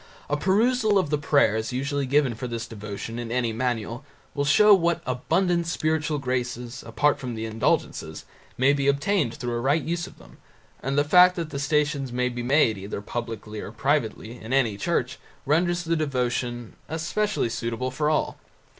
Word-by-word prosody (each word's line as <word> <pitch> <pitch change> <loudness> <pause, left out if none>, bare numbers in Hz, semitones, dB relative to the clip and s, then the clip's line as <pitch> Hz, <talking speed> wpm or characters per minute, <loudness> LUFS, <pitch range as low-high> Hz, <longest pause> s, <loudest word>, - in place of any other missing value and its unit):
A - - +3
perusal 215 +6 +2
of 175 -6 0
the 150 - +2
prayers 125 -7 +2
usually 140 +2 -2
given 140 -2 +2
for 115 +3 -5
this 115 -1 -4
devotion 110 +1 -7
in 115 -1 -5
any 120 -2 0
manual 120 +1 -2 0.3
will 140 0 -1
show 210 +9 +6
what 170 -3 +2
abundant 170 +7 0
spiritual 155 -2 0
graces, 125 -2 -3
apart 145 0 +1
from 125 -3 -5
the 110 0 -4
indulgences, 110 0 -1 0.3
may 135 +3 +4
be 140 -1 0
obtained 140 - +1
through 120 -1 -4
a 120 - -1
right 140 +6 +1
use 170 +1 -2
of - - -15
them, - - -17 0.4
and 135 +2 -2
the 145 - +5
fact 180 +4 +6
that 165 -3 -4
the 140 - -4
Stations 145 -2 0
may 125 +1 0
be 120 0 -5
made 120 -5 +3
either 100 +1 -5
publicly 110 -1 -6
or 105 - -7
privately 115 -1 -1
in 115 +4 -5
any 120 -6 +2
church 135 +1 -1 0.3
renders 175 +4 +1
the 165 0 0
devotion 125 -5 -2 0.2
specially 205 - 0
suitable 115 +2 -3
for 150 +3 0
all. 155 - 0
135 Hz, 175 wpm, -25 LUFS, 120-155 Hz, 0.4 s, show